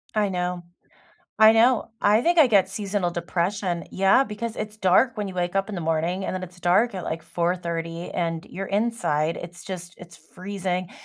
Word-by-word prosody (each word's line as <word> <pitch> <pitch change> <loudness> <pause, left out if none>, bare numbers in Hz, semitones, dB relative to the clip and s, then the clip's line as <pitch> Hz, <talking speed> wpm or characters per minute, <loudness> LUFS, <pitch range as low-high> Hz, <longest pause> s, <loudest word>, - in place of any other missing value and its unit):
I 210 -2 +2
know, 180 -1 -2 0.8
I 220 0 +9
know. 230 +1 +3
I 210 +2 +4
think 345 +6 +2
I 310 - +8
get 200 -5 +3
seasonal 195 -2 -2
depression. 175 +1 -2
Yeah, 195 +7 +4
because 225 0 -5
it's 215 0 -5
dark 215 +5 +3
when 210 -1 -2
you 190 - -7
wake 175 +1 -2
up 195 +2 0
in 210 - -5
the 180 - -4
morning, 165 +4 -1
and - - -2
then 185 - -4
it's 180 0 -15
dark 200 +7 +3
at, 185 - -4
like, 165 0 -4
4:30 170 -1 -3
and 165 -2 -2
you're 195 +1 -5
inside. 200 -8 0
It's 175 0 -10
just 180 -2 -7
it's 170 -2 -13
freezing. 185 -1 -4
185 Hz, 190 wpm, -24 LUFS, 175-210 Hz, 0.8 s, I